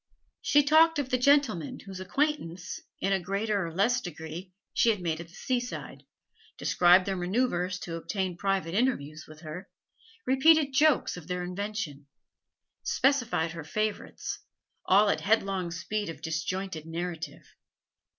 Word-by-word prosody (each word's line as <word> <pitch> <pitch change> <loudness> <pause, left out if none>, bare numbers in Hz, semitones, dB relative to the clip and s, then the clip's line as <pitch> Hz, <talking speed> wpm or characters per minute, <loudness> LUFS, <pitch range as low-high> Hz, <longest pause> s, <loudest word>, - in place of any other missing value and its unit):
She 290 0 +4
talked 320 +3 +5
of 285 -3 -1
the 255 - +2
'gentlemen' 275 - +2
whose 190 -2 -9
acquaintance, 185 - -2 0.2
in 195 - +1
a 190 - +2
greater 200 +1 -1
or - - -6
less 230 +9 +2
degree, 170 +1 -7 0.2
she 235 - +4
had 210 -3 +2
made 165 -3 -2
at 170 - -10
the 170 - -18
seaside; 245 -1 -4 0.5
described 180 +1 +5
their 195 - -1
manoeuvres 185 -1 0
to 170 - -6
obtain 185 +2 -2
private 190 -2 -1
interviews 160 - 0
with 155 0 -13
her, 175 +4 -8 0.6
repeated 285 +2 +5
jokes 295 -7 +3
of 170 -3 -10
their 180 -1 -2
invention, 180 -6 -4 0.7
specified 245 - +1
her 165 -2 -7
favourites, 215 +6 -3 0.5
all 205 +3 +6
at - - +1
headlong 195 -4 +1
speed 200 +4 -3
of 160 -1 -9
disjointed 165 0 -3
narrative. 165 -1 -5
190 Hz, 140 wpm, -29 LUFS, 170-240 Hz, 0.7 s, all